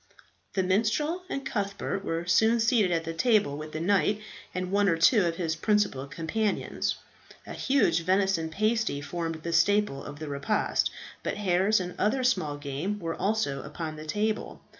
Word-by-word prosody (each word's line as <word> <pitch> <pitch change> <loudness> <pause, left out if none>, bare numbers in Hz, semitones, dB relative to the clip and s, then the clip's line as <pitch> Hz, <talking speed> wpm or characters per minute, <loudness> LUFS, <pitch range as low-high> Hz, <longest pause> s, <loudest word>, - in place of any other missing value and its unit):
The 190 - +2
minstrel 225 - +1
and 275 - -4
Cuthbert 200 -1 -2
were 165 -2 -2
soon 220 +7 +4
seated 220 -4 +3
at 165 -1 +1
the 165 0 -4
table 205 - +2
with 155 +1 -7
the 155 - -4
knight 200 +4 +2 0.3
and 185 0 -3
one 200 0 +3
or 165 - +2
two 200 +6 +5
of 165 - -1
his 165 -2 -1
principal 200 -7 +1
companions. 180 +8 -1 0.5
A - - -7
huge 270 -10 +2
venison 185 -2 +1
pasty 215 -2 0
formed 165 +2 -4
the 170 - -3
staple 200 -2 +2
of 145 - -8
the 155 0 -6
repast, 140 +9 0 0.3
but - - -3
hares 195 +1 +2
and 180 -1 -4
other 255 +6 +1
small 155 - +1
game 145 +8 -3
were 165 -3 -3
also 200 -11 -1
upon 160 -2 -6
the 155 0 -8
table. 215 +5 -2
185 Hz, 170 wpm, -28 LUFS, 160-215 Hz, 0.5 s, two